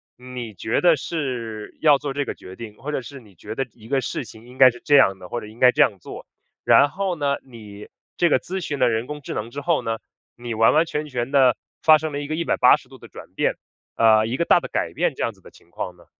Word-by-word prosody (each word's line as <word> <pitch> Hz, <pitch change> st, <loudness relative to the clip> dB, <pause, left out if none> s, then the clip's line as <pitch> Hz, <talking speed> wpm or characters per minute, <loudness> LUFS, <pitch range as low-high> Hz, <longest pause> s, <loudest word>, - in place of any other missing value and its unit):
你 125 Hz, -3 st, -8 dB
觉 110 Hz, +6 st, -1 dB
得 175 Hz, -2 st, +5 dB
是 125 Hz, -8 st, -5 dB
要 150 Hz, -3 st, +6 dB
做 140 Hz, -2 st, -4 dB
这 145 Hz, +1 st, -1 dB
个 -, -, -4 dB
决 95 Hz, 0 st, -12 dB
定， 110 Hz, -3 st, -10 dB
或 150 Hz, -, -6 dB
者 145 Hz, -, -2 dB
是 140 Hz, +2 st, -10 dB
你 105 Hz, -6 st, -20 dB
觉 -, -, -8 dB
得 135 Hz, +3 st, -3 dB
一 110 Hz, -1 st, -16 dB
个 135 Hz, 0 st, 0 dB
事 125 Hz, +2 st, -4 dB
情 110 Hz, +1 st, -14 dB
应 125 Hz, +1 st, -14 dB
该 130 Hz, -2 st, +8 dB
是 120 Hz, -, -13 dB
这 145 Hz, -, +4 dB
样 95 Hz, -8 st, +5 dB
的， 90 Hz, -, -10 dB
或 120 Hz, -, -4 dB
者 105 Hz, -, -9 dB
应 110 Hz, +2 st, -15 dB
该 125 Hz, -1 st, +6 dB
这 -, -, +1 dB
样 100 Hz, -, 0 dB
做。 -, -, -10 dB, 0.4 s
然 145 Hz, -, +5 dB
后 190 Hz, +2 st, -2 dB
呢， 140 Hz, -3 st, 0 dB
你 105 Hz, -5 st, -12 dB, 0.3 s
这 175 Hz, -, +3 dB
个 140 Hz, -, +3 dB
咨 190 Hz, +6 st, -5 dB
询 145 Hz, -4 st, -4 dB
了 125 Hz, -, +4 dB
人 115 Hz, +1 st, -1 dB
工 150 Hz, 0 st, -6 dB
智 -, -, -6 dB
能 110 Hz, +2 st, -5 dB
之 145 Hz, +3 st, -6 dB
后 165 Hz, +1 st, +1 dB
呢， 115 Hz, 0 st, -3 dB, 0.4 s
你 120 Hz, -1 st, -6 dB
完 115 Hz, +1 st, +4 dB
完 160 Hz, +2 st, +4 dB
全 150 Hz, -1 st, -4 dB
全 125 Hz, -1 st, -4 dB
地 130 Hz, -4 st, +4 dB, 0.3 s
发 155 Hz, -1 st, +7 dB
生 155 Hz, 0 st, -4 dB
了 145 Hz, -, -3 dB
一 145 Hz, -, -6 dB
个 155 Hz, -, -3 dB
180 170 Hz, 0 st, +3 dB
度 -, -, -14 dB
的 -, -, -14 dB
转 -, -, -13 dB
变， -, -, 0 dB, 0.4 s
呃， 110 Hz, -1 st, +4 dB
一 120 Hz, +4 st, -3 dB
个 170 Hz, -, 0 dB
大 -, -, +5 dB
的 -, -, -6 dB
改 -, -, -2 dB
变 -, -, 0 dB
这 -, -, -8 dB
样 -, -, -1 dB
子 -, -, -25 dB
的 -, -, -16 dB
情 85 Hz, -, -22 dB
况 90 Hz, +1 st, -6 dB
呢？ 85 Hz, -, -20 dB
125 Hz, 290 characters per minute, -22 LUFS, 115-145 Hz, 0.4 s, 该